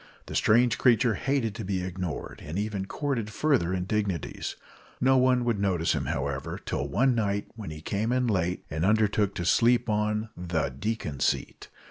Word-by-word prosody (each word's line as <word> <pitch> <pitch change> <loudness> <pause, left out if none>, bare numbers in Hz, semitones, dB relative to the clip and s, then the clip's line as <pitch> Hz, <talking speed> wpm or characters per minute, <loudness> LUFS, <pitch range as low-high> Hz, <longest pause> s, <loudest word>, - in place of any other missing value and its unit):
The - - -8
strange 120 +1 +3
creature 120 -1 +4
hated 130 -1 0
to 110 +1 -6
be 95 -2 -2
ignored, 90 -3 -5
and 80 +5 -5
even 100 -2 -2
courted 130 -6 -2
further 115 - +1
indignities. 95 -1 -2 0.4
No 130 +1 +4
one 125 -1 +3
would 115 -4 +1
notice 90 -4 +1
him, - - -2
however, 70 +3 -3
till - - -3
one 130 +6 +2
night 100 -3 0
when 110 -5 -7
he 75 0 -8
came 105 +6 -1
in 125 0 +2
late, 90 -5 0
and 80 +2 -2
undertook 105 0 +2
to 85 - -3
sleep 120 +5 +3
on 105 +1 0
the 85 -4 -1
"deacon 75 - -3
seat." - - -1
105 Hz, 170 wpm, -27 LUFS, 90-115 Hz, 0.4 s, creature